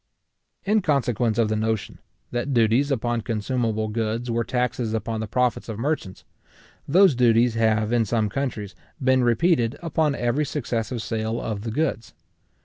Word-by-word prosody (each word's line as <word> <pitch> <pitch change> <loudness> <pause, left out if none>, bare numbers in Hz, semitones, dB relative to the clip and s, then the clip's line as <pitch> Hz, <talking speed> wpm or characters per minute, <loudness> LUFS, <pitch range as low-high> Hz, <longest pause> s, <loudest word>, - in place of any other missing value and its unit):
In 210 +2 +3
consequence 120 - +1
of 115 -2 +3
the 110 - -1
notion, 110 -1 -2 0.3
that 125 +3 -2
duties 120 +5 +3
upon 120 -3 0
consumable 110 0 -1
goods 115 +2 -2
were 115 0 0
taxes 125 -2 -1
upon 110 +1 -3
the 110 - -3
profits 125 +1 0
of 110 - -4
merchants, 120 -7 -3 0.6
those 185 +3 +5
duties 120 -1 +3
have, 110 0 +1
in 115 -2 +3
some 110 0 0
countries, 105 -4 -3 0.3
been 130 -2 +3
repeated 120 0 +2
upon 160 -3 0
every 120 +4 0
successive 120 -5 -3
sale 110 0 -2
of 105 -2 -4
the 115 - -4
goods. 120 - -2
115 Hz, 150 wpm, -24 LUFS, 110-130 Hz, 0.6 s, those